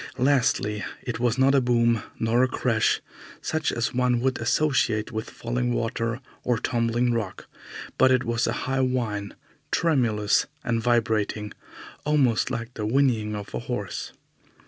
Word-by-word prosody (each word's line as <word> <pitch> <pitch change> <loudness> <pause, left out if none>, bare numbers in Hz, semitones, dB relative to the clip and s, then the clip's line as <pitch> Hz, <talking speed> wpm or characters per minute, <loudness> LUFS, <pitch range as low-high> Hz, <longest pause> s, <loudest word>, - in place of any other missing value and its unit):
Lastly, 120 -6 +2 0.2
it 125 -2 -4
was 120 0 +1
not 135 +1 +4
a 140 - +4
boom, 120 -2 +2 0.2
nor 115 +2 +2
a 130 - +4
crash, 115 -3 +1 0.4
such 155 -1 -1
as 115 - -1
one 125 -1 +2
would 130 0 0
associate 115 -3 +1
with 110 0 -4
falling 120 +1 -2
water 115 +1 -2 0.2
or 120 -2 +1
tumbling 120 0 +1
rock, 110 -5 -3 0.5
but - - +6
it 130 0 +3
was 115 0 0
a - - +1
high 135 0 0
whine, 115 -6 -1 0.3
tremulous 120 -10 +2 0.2
and 115 -1 0
vibrating, 110 -3 0 0.5
almost 140 -7 +2
like 115 +1 -4
the 105 - -5
whinnying 115 -4 +2
of 100 -1 -7
a 60 - -2
horse. - - -4
120 Hz, 145 wpm, -25 LUFS, 110-130 Hz, 0.5 s, but